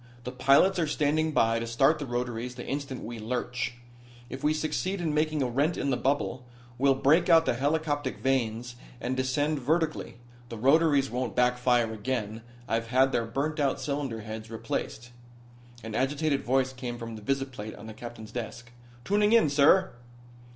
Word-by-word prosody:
The 125 - -5
pilots 140 +9 +4
are 165 - +1
standing 150 +1 +1
by 115 -5 +2
to 115 - -4
start 135 +7 +3
the 145 - -5
rotaries 120 0 -3
the 120 - -7
instant 140 -2 -4
we 115 0 -6
lurch. 125 +2 -3 0.6
If 130 - -7
we 150 - +3
succeed 160 +5 -2
in 165 -3 -1
making 155 -1 +1
a - - 0
rent 140 +7 0
in 140 - -1
the - - +2
bubble 125 -3 -1 0.4
we'll 135 0 +4
break 155 +7 +3
out 165 -1 +6
the - - +2
helicoptic 145 +1 -1
vanes 120 -2 -1 0.2
and 130 - -2
descend 145 +4 0
vertically. 155 +3 -1 0.3
The 115 - -6
rotaries 140 +2 +3
won't 125 -2 -3
backfire 125 -2 +2
again. 110 -1 -3 0.3
I've 115 0 -1
had 130 +2 +3
their 115 -2 0
burnt 145 +6 -2
out 140 -2 +1
cylinder 140 -6 -3
heads 110 +1 -7
replaced." 115 +1 -4 0.7
An 110 -1 -6
agitated 140 +4 0
voice 130 +1 +1
came 125 -2 -5
from 115 -1 -7
the 110 - -9
visiplate 130 -3 -3
on 105 - -11
the 110 - -8
captain's 115 -1 -9
desk: 120 0 -6 0.3
"Tuning 205 +2 +3
in, 225 -11 +5
sir." 145 +6 +5
130 Hz, 170 wpm, -28 LUFS, 120-145 Hz, 0.7 s, out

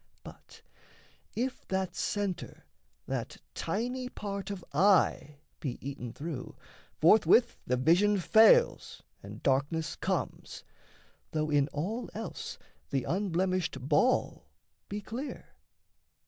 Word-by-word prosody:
But - - -14 0.7
if 255 +3 -3
that 190 -1 -2
centre, 200 -4 -3 0.4
That - - -4 0.2
tiny 250 +4 -2
part 200 -3 -5
of 195 -3 -6
eye, 155 -4 +3 0.2
be 130 -5 -4
eaten 130 -3 -6
through, 145 -3 -6 0.4
Forthwith 220 +7 +5
the 125 - +1
vision 180 +10 +4
fails 225 - +4 0.2
and - - -10
darkness 145 +4 0
comes, - - -3 0.7
Though 155 -1 0
in 145 -1 +3
all 185 - -3
else 225 +1 -6 0.3
the 135 - 0
unblemished 185 -1 0
ball 150 - +1 0.4
be 205 +1 -4
clear. 250 +8 -6
185 Hz, 105 wpm, -30 LUFS, 150-210 Hz, 0.7 s, Forthwith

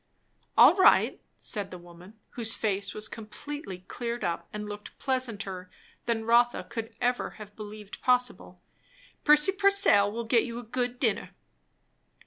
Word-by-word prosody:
"All - - +9
right," 380 - +5 0.2
said 200 -2 -4
the 180 - -8
woman, 175 +4 -15
whose 225 -2 -1
face 200 -2 -1
was 215 0 -4
completely 215 -3 -8
cleared 235 0 -4
up 170 - -2
and 210 0 -5
looked 205 0 -9
pleasanter 205 -8 -3 0.4
than 225 -1 0
Rotha 240 +1 +3
could 225 -1 -6
ever 245 0 -1
have 210 -2 -11
believed 210 -1 -9
possible. 250 0 0 0.6
"Prissy 300 +4 +6
Purcell 395 - +4
will 235 +2 -4
get 230 0 +3
you 235 -1 -6
a 245 - -6
good 245 +1 -3
dinner." 225 -6 -1
225 Hz, 140 wpm, -28 LUFS, 205-245 Hz, 0.6 s, All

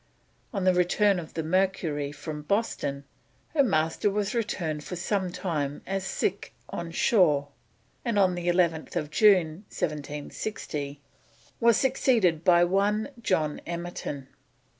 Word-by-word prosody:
On 195 -4 -2
the 185 0 +4
return 180 +2 +3
of 165 -2 -9
the 160 - -1
Mercury 165 -5 0
from 150 +1 -6
Boston 150 -6 -1 0.5
her 300 - +3
Master 160 - +2
was 205 0 -1
returned 165 -10 -2
for 180 - -6
some 185 +1 -1
time 160 -6 -3
as 195 0 -2
"sick 195 0 -2 0.2
on 170 -1 -5
shore," 160 -6 +3 0.5
and 230 -3 0
on 190 -2 +4
11th 170 -4 0
June 190 -3 +5 0.2
1760 145 -1 -4 0.6
was 235 -1 +5
superseded 220 - +2
by 175 0 +6
one 200 +6 +1
John 155 -8 0
Emerton. 170 -5 -5
175 Hz, 120 wpm, -27 LUFS, 155-200 Hz, 0.6 s, by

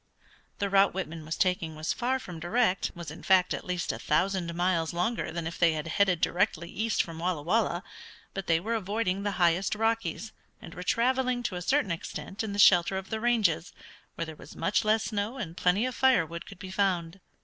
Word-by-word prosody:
The 200 - 0
route 195 -1 +4
Whitman 165 -4 -5
was 155 - -3
taking 180 -4 0
was 155 +1 -2
far 255 +2 0
from 180 -10 -8
direct, 190 +3 +1
was 170 -3 -7
in 155 - -10
fact 185 -1 +4
at - - -4
least 180 -2 -1
a - - -6
thousand 180 +2 0
miles 170 -2 +1
longer 180 +7 -1
than 170 -1 -4
if 165 - -5
they 170 -2 +4
had 155 -1 -3
headed 180 +1 +2
directly 175 -2 0
east 220 0 0
from 165 -1 -9
Walla 170 -3 -1
Walla, 180 0 +1 0.5
but 195 -1 -5
they 165 -1 +3
were 220 +7 -3
avoiding 200 -2 -1
the 205 0 -1
highest 175 +3 +2
Rockies, 225 -2 -1 0.3
and 165 - -11
were 180 - -8
traveling 250 +5 +1
to 195 - -2
a 180 - -4
certain 265 +1 +1
extent 190 +4 -5
in 215 - -3
the 200 - -4
shelter 185 -2 +6
of 190 0 -7
the 220 - -1
ranges, 220 -9 +1 0.4
where 165 - -3
there 160 -1 -8
was - - -13
much 190 +7 +1
less 215 +1 +2
snow 215 +4 -2
and 170 -9 -5
plenty 185 +6 +2
of 255 - -2
fire 260 -11 +4
wood 170 +2 -8
could - - -11
be 185 +1 -8
found. 185 -2 0
185 Hz, 215 wpm, -28 LUFS, 170-220 Hz, 0.5 s, shelter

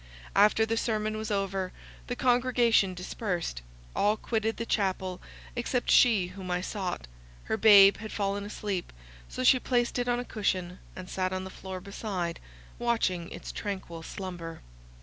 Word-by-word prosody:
After 210 +2 +5
the 225 0 -1
sermon 215 -2 0
was 215 0 -4
over, 195 -2 -1 0.4
the 245 - -2
congregation 245 -6 +3
dispersed; 180 - -3 0.3
all 210 +2 +3
quitted 225 -1 -1
the 230 - -3
chapel 190 -4 -1 0.3
except 245 +1 0
she 210 -7 +5
whom 185 0 -8
I 180 0 +1
sought; 185 - -3 0.4
her - - -1
babe 200 -2 +8
had 220 -1 -7
fallen 200 -1 -1
asleep; 205 -3 -4 0.4
so - - -4
she 255 0 +6
placed 245 -1 0
it 245 - -1
on 245 0 +1
a 245 - -4
cushion, 185 -5 -2 0.2
and 185 -1 -8
sat 185 0 -1
on 185 0 -2
the 190 - -7
floor 190 -1 -7
beside, 185 -3 -4 0.4
watching 205 -8 0
its - - -7
tranquil 190 -5 -5
slumber. 170 -2 -7
200 Hz, 155 wpm, -29 LUFS, 185-225 Hz, 0.4 s, babe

